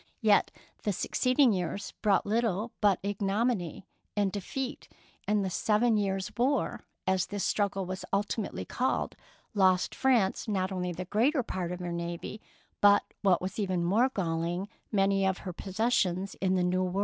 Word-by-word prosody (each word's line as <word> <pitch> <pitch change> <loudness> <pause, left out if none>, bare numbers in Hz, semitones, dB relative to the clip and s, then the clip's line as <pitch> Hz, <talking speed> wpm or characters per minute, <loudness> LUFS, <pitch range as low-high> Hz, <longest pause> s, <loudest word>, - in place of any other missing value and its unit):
Yet 215 -3 +4 0.3
the 205 - 0
succeeding 255 +5 +3
years 185 +2 -3
brought 205 -3 +3
little 220 0 0
but 200 -3 +4
ignominy 200 -2 -1 0.3
and 200 -2 +2
defeat, 255 +8 -5 0.4
and 210 -1 +2
The 190 - -2
Seven 220 +5 +2
Years 195 -2 -1
War, 260 +4 0 0.2
as 190 -1 +1
this 205 -1 -3
struggle 200 -2 0
was 185 +1 -5
ultimately 205 +1 -1
called, 255 +1 -1 0.4
lost 185 -3 +3
France 240 -8 +2
not 190 -2 0
only 180 -1 -2
the 180 +2 -5
greater 250 - +2
part 180 -5 -3
of 180 0 -5
her 175 -1 -3
navy, 170 +4 -5 0.4
but, 205 0 +6 0.2
what 185 -3 +3
was 190 +3 -4
even 185 -4 0
more 225 +9 +3
galling, 175 -2 -2 0.2
many 195 -1 +2
of 190 -1 +1
her 180 - -4
possessions 190 -1 0
in 190 -1 +2
the 180 - +2
New 180 +1 +1
World. 185 +1 -1
195 Hz, 160 wpm, -29 LUFS, 185-215 Hz, 0.4 s, but